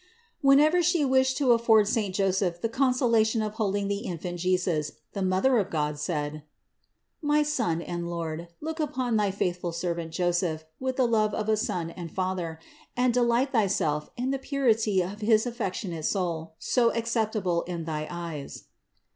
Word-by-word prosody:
661. 275 0 +6
Whenever 310 +5 +4
She 335 -3 +2
wished 260 0 +3
to 270 -4 +3
afford 225 -3 +5
saint 210 -5 0
Joseph 190 -3 +1
the 230 - 0
consolation 235 -3 +2
of 210 -1 -3
holding 205 -2 -1
the 200 0 -1
Infant 175 -4 -5
Jesus, 180 -4 0 0.2
the 200 - -3
Mother 190 +7 +3
of 200 -2 -1
God 150 -2 -1
said: 150 -1 -3 0.8
"My 300 0 +3
Son 230 - -1
and 170 0 -4
Lord, 165 -1 -4
look 320 +1 -4
upon 260 -6 -1
thy 210 -2 +2
faithful 180 -2 -2
servant 170 -1 -3
Joseph 175 -2 0
with 260 0 -2
the 255 - +3
love 215 -3 +2
of 215 -1 -2
a 215 - +4
son 170 -5 -2
and 170 -2 -8
father, 185 -3 -2 0.4
and 250 -1 +3
delight 245 +2 +2
Thyself 185 - +1
in 255 +2 -1
the 275 - -1
purity 225 -9 +1
of 200 +4 -7
his 215 +1 +3
affectionate 190 -8 -3
soul, 165 -4 -2
so 235 -2 +2
acceptable 220 -6 0
in 170 -2 -4
thy 155 -1 -3
eyes." 170 -5 -6
200 Hz, 165 wpm, -27 LUFS, 170-240 Hz, 0.8 s, 661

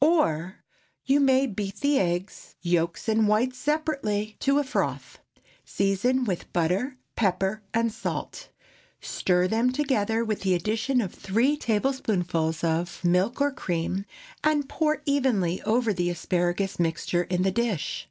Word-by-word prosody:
Or, 185 - +2
✠ - - -38 0.4
You 275 +2 +4
may 270 -1 +4
beat 205 -4 -5
the 285 -1 +3
eggs—yolks 175 -1 -2
and 220 -1 +3
whites 245 +5 +1
separately—to 275 -5 0
a 290 - +3
froth; 260 - -3 0.4
season 200 +7 +1
with 190 -7 -3
butter, 185 - 0 0.2
pepper, 195 +1 0
and 230 0 +1
salt; - - -5 0.5
stir 180 0 +1
them 230 +5 +2
together, 230 -5 0
with 215 -2 -2
the 190 -2 +2
addition 220 +8 0
of 190 -5 -4
three 235 +9 +1
tablespoonfuls 205 - 0
of 170 +2 -1
milk 185 +9 +2
or 285 0 +3
cream, 185 -4 -2 0.4
and 300 -2 +2
pour 305 +1 0
evenly 240 - +1
over 230 -1 +1
the 175 -1 0
asparagus 175 +2 -1
mixture 175 +1 0
in 180 +1 0
the 190 - +2
dish. 210 -7 -1
210 Hz, 135 wpm, -26 LUFS, 180-260 Hz, 0.5 s, You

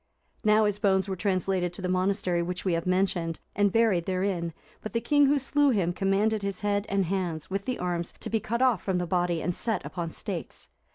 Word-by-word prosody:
Now 215 0 +5
his 205 -1 0
bones 190 -2 +2
were 190 - -2
translated 185 -2 0
to 185 - -7
the - - 0
monastery 185 -1 +1
which 180 +2 -4
we 185 - +2
have 165 +1 -1
mentioned, 180 -3 0 0.2
and 205 -1 +3
buried 210 -6 +2
therein: 185 -2 -1 0.3
but 215 - -6
the 230 - +2
king 290 +3 +4
who 290 +1 +3
slew 285 +2 +2
him 190 -8 +1
commanded 200 +3 +1
his 200 -1 -3
head, 205 0 0
and 195 -1 +1
hands, 175 -3 -3
with 195 +1 -2
the 255 -1 -2
arms, 175 -1 -2
to - - -3
be 225 - +2
cut 235 +4 -1
off 245 -8 +3
from 190 -2 -1
the 180 - -1
body, 175 -1 0
and 175 - -1
set 225 -2 -1
upon 170 -2 -4
stakes. - - -6
195 Hz, 220 wpm, -27 LUFS, 180-210 Hz, 0.3 s, Now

